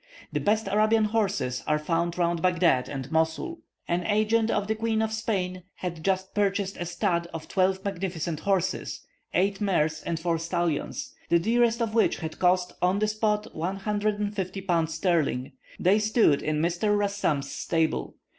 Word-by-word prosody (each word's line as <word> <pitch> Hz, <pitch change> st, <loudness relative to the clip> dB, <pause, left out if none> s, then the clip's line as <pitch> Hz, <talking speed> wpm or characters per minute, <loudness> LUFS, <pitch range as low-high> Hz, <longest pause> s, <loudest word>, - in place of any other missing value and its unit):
The -, -, +1 dB
best 215 Hz, 0 st, +1 dB
Arabian 215 Hz, +2 st, +3 dB
horses 200 Hz, -, 0 dB
are 150 Hz, -1 st, +3 dB
found 170 Hz, +3 st, -1 dB
round 170 Hz, -1 st, +1 dB
Baghdad 170 Hz, -8 st, +3 dB
and 135 Hz, -1 st, -5 dB
Mosul. 160 Hz, -, 0 dB, 0.3 s
An 175 Hz, +1 st, 0 dB
agent 220 Hz, +2 st, +2 dB
of 200 Hz, -, +1 dB
the 215 Hz, -, 0 dB
Queen 220 Hz, 0 st, 0 dB
of 220 Hz, 0 st, 0 dB
Spain 190 Hz, -5 st, -2 dB
had 170 Hz, -3 st, -5 dB
just 190 Hz, 0 st, 0 dB
purchased 200 Hz, -1 st, 0 dB
a 175 Hz, -, -4 dB
stud 170 Hz, 0 st, 0 dB
of 160 Hz, -, -6 dB
twelve 190 Hz, 0 st, +1 dB
magnificent 175 Hz, -5 st, -3 dB
horses 190 Hz, 0 st, -1 dB, 0.3 s
(eight 195 Hz, +2 st, +1 dB
mares 160 Hz, -6 st, +1 dB
and 165 Hz, -, -3 dB
four 165 Hz, -1 st, 0 dB
stallions), 170 Hz, -, -2 dB, 0.2 s
the 170 Hz, -, +5 dB
dearest 235 Hz, +5 st, +2 dB
of 220 Hz, -2 st, -3 dB
which 225 Hz, -, +3 dB
had 160 Hz, -1 st, -6 dB
cost 180 Hz, 0 st, +2 dB
on 180 Hz, +2 st, +3 dB
the 215 Hz, +1 st, +1 dB
spot 210 Hz, 0 st, -1 dB
150 205 Hz, +2 st, -2 dB
pounds 165 Hz, -4 st, 0 dB
sterling. 155 Hz, -7 st, 0 dB, 0.3 s
They 195 Hz, +4 st, +4 dB
stood 215 Hz, -, +3 dB
in 155 Hz, 0 st, 0 dB
Mr. 180 Hz, +5 st, +1 dB
Rassam's 200 Hz, -9 st, 0 dB
stable. 160 Hz, -, -1 dB
185 Hz, 160 wpm, -27 LUFS, 165-210 Hz, 0.3 s, the